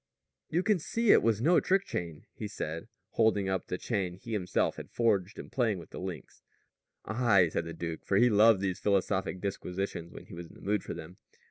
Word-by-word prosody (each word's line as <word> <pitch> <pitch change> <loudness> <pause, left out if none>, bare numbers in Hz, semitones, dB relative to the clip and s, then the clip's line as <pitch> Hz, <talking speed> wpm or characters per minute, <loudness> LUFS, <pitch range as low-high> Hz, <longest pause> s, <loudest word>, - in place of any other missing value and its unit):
"You 175 +3 +1
can 205 -2 +3
see 230 +7 +2
it - - +7
was 115 -1 +1
no 175 +4 +5
trick 195 +1 +2
chain," 85 -3 -5
he - - -5
said, 80 +1 -5 0.2
holding 110 -3 +2
up 95 -1 -1
the 90 - -2
chain 95 -6 -2
he 115 +5 -8
himself 95 -4 0
had - - -8
forged 105 -4 +1
and - - -9
playing 115 -6 +1
with 85 -2 -11
the - - -7
links. 90 -1 -7 0.6
"Aye," 110 -6 +3
said 85 - -2
the 85 - -6
duke, 80 -1 -5
for 95 - +1
he 120 - +6
loved 110 -2 +5
these 95 -2 -1
philosophic 95 -1 0
disquisitions, 95 -3 -4
when - - -11
he - - -13
was 85 0 -7
in - - -17
the - - -15
mood 105 0 0
for - - -5
them. 85 +3 -9
100 Hz, 215 wpm, -30 LUFS, 90-115 Hz, 0.6 s, it